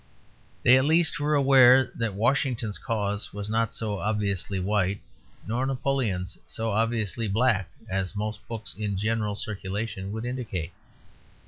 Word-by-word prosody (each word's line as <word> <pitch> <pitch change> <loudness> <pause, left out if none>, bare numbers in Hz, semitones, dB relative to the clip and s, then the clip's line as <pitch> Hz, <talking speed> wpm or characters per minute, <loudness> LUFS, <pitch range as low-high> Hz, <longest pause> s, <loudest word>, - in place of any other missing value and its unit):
They 130 +2 +7
at 130 - +1
least 165 +1 +3
were 150 +1 +1
aware 130 -2 +6
that 115 -4 -2
Washington's 120 -1 0
cause 105 -2 -2
was 105 +1 -5
not 115 0 +1
so 105 -3 -3
obviously 100 -2 -1
white 100 0 0 0.5
nor 115 +5 -1
Napoleon's 125 -9 -1
so 115 0 -3
obviously 115 0 0
black 105 -2 +2 0.2
as 95 +1 -2
most 105 +1 -4
books 115 -1 -5
in 105 -2 -3
general 105 0 0
circulation 100 -1 -4
would 110 +2 -4
indicate. 110 -9 -4
110 Hz, 135 wpm, -26 LUFS, 100-120 Hz, 0.5 s, They